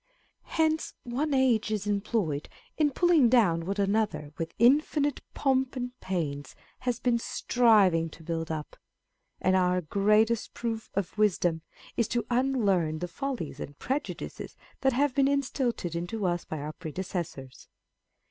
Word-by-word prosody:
Hence 315 0 +1
one 270 +6 -2
age 255 -5 +3
is 210 -2 -2
employed 200 -7 -1 0.3
in 305 -2 +3
pulling 320 -4 +4
down 180 -9 +3
what 200 +1 -2
another 200 -6 0
with 165 0 -5
infinite 285 +3 +3
pomp 265 -1 +1
and 250 -1 -3
pains 145 -7 -3 0.2
has 250 -3 -1
been 240 -2 +2
striving 205 -10 +3
to 160 - -14
build 165 0 -3
up; 155 -2 -5 0.6
and 185 - +2
our 180 -1 +3
greatest 210 +6 +2
proof 225 -1 -3
of 200 +2 -3
wisdom 175 -5 +2 0.4
is 235 -3 +2
to 235 -2 -1
unlearn 210 -11 +2
the 180 +3 -3
follies 205 - -4
and 145 0 -7
prejudices 275 +4 -4
â€¢ - - -27
that 265 -1 +3
have 280 +2 +2
been 275 +1 +3
instilled 270 -5 0
into 175 +5 -3
us 175 -1 0
by 155 - -5
our 150 +1 -5
predecessors. 165 -5 -6
210 Hz, 145 wpm, -28 LUFS, 170-255 Hz, 0.6 s, pulling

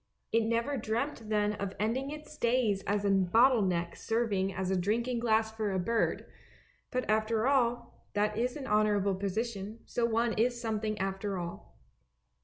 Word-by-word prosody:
It 225 0 +3
never 235 +5 0
dreamt 225 0 -2
then 210 -1 +2
of 200 -1 -4
ending 240 +6 0
its 305 +1 -8
days 235 -6 +1
as 205 0 0
a 200 - +3
bottle 225 +6 +4
neck 175 -3 0
serving 210 -4 0
as 190 0 -2
a - - +2
drinking 230 +7 0
glass 220 -1 +2
for 220 -2 -2
a 190 - 0
bird; 225 +6 0 0.6
but 255 0 -2
after 220 +1 +1
all, 240 -3 0
that 210 +1 +1
is 245 +3 -1
an 275 - -6
honourable 210 -3 +2
position, 205 +2 -3
so 235 -1 0
one 230 0 +1
is 240 +2 +1
something 215 -2 -2
after 195 0 -2
all. 175 -1 -7
220 Hz, 165 wpm, -31 LUFS, 200-235 Hz, 0.6 s, bottle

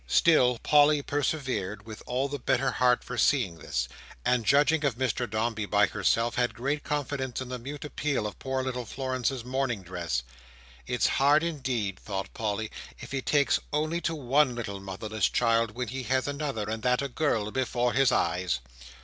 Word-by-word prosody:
Still, 125 - +4
Polly 145 +2 +4
persevered 125 -9 -2
with 110 -1 -9
all 130 +3 0
the 140 0 -5
better 130 +1 +1
heart 125 0 +3
for 125 -1 -5
seeing 100 - +2
this; 65 -4 -2 0.4
and, 125 -2 +2
judging 150 +2 +4
of 140 -5 +1
Mr 125 -1 -1
Dombey 110 -1 -1
by 105 0 +4
herself, 115 +4 +1
had 120 0 +1
great 140 +6 -2
confidence 140 -4 -2
in 130 -1 -5
the 125 -1 -4
mute 140 +4 -7
appeal 145 -5 -1
of 105 - -6
poor 130 0 -2
little 125 -1 -3
Florence's 130 -1 -2
mourning 125 -5 -1
dress. 85 -8 -3 0.6
"It's - - +1 0.2
hard 145 +3 +5
indeed," 130 - -2
thought 95 -2 -5
Polly, 110 0 -2 0.3
"if - - -9
he 135 -1 -1
takes 145 +1 +2
only 155 +3 0
to 165 - -1
one 135 -1 +2
little 100 -4 -4
motherless 100 +2 -2
child, 115 -2 +2
when 125 -2 -3
he 130 +3 -4
has 130 0 0
another, 140 -7 -3
and 110 +1 -3
that 125 +2 +2
a - - -1
girl, 120 -6 0
before 125 -1 0
his 135 -1 +4
eyes." 90 - +1
125 Hz, 175 wpm, -28 LUFS, 110-140 Hz, 0.6 s, hard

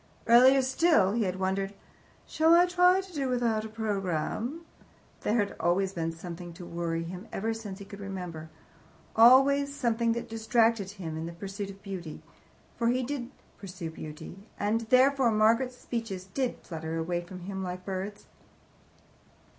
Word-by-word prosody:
Earlier 260 +3 +7
still 260 - +3
he 225 0 +1
had 185 -1 -2
wondered, 195 +1 -1 0.5
"Shall 320 +1 +4
I 350 +1 +6
try 360 +1 +4
to 380 -1 -14
do 275 -4 -1
without 235 -3 +1
a - - -6
programme?" 215 - -2 0.6
There 210 - 0
had 205 -2 0
always 185 +3 +1
been 165 -2 -2
something 170 +1 -8
to 175 +1 -10
worry 170 -1 -3
him 180 +5 -8
ever 225 +3 -1
since 215 -4 -7
he 200 - -10
could 200 0 -11
remember, 180 -5 -6 0.7
always 275 +4 +6
something 235 -3 +1
that 235 - -4
distracted 225 -2 +1
him 165 -4 -5
in 160 +1 -4
the 170 - -7
pursuit 195 +3 -6
of 195 0 -12
beauty. 180 -6 -7 0.5
For 235 - +1
he 250 +2 +2
did 250 -2 -4 0.3
pursue 180 -4 -7
beauty, 155 +4 -9 0.2
and 210 +3 +1
therefore, 260 0 +5
Margaret's 230 +4 +2
speeches 225 -8 -5
did 255 +6 -2
flutter 160 -1 -5
away 175 +2 -1
from 180 +1 -10
him 190 +1 -5
like 180 0 -5
birds. 195 +2 -5
205 Hz, 160 wpm, -29 LUFS, 180-240 Hz, 0.7 s, Earlier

